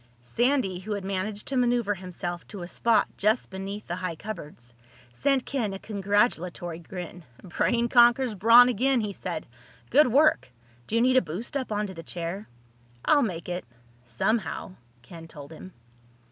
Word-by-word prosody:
Sandy, 235 - +1
who 210 +3 -4
had 200 -2 -4
managed 200 +2 -3
to 270 - -2
maneuver 240 -4 +2
himself 175 -2 -6
to 200 -4 -8
a - - -6
spot 220 +3 +2
just 215 +2 +1
beneath 195 +2 -6
the 175 - -4
high 185 -2 -3
cupboards, 150 - -9 0.4
sent 270 - +1
Ken 230 -8 -2
a - - -4
congratulatory 190 -5 -1
grin. 175 0 -8 0.2
"Brain 235 +6 0
conquers 240 0 +5
brawn 230 +5 +7
again," 250 +1 +2
he 210 -2 -3
said. - - -5 0.5
"Good 295 +1 +6
work. 285 - +3 0.4
Do - - -2
you 230 - +4
need 255 +1 +4
a - - +6
boost 180 - -6
up 260 -5 -2
onto 210 -2 -2
the 165 - -8
chair?" 170 +5 -5 0.6
"I'll 295 - +5
make 180 -9 -3
it—somehow," 120 - -4 0.3
Ken 165 +6 -11
told 145 -2 -11
him. 185 +4 -10
200 Hz, 160 wpm, -27 LUFS, 175-235 Hz, 0.6 s, brawn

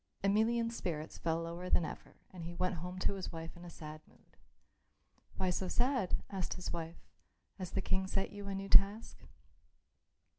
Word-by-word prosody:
Emelian's 230 +3 +3
spirits 155 -6 -3
fell 165 0 +1
lower 170 +2 -4
than 170 - +4
ever - - -7 0.2
and 180 -2 -7
he 170 +1 -5
went 185 0 0
home 180 +3 -5
to 185 - +2
his 195 -2 -4
wife 165 0 -6
in 175 - -11
a 175 - -7
sad 155 -2 -8
mood. - - -25 1.0
"Why 185 -2 +2
so 185 +1 -1
sad?" 245 -1 +2
asked 190 -2 -2
his 180 - -4
wife. 165 0 -4 0.6
"Has 185 -2 -3
the 195 - -1
King 190 0 +1
set 195 0 0
you 205 -1 -7
a 195 - -2
new 195 0 -3
task?" 200 +3 +5
185 Hz, 180 wpm, -35 LUFS, 170-195 Hz, 1.0 s, task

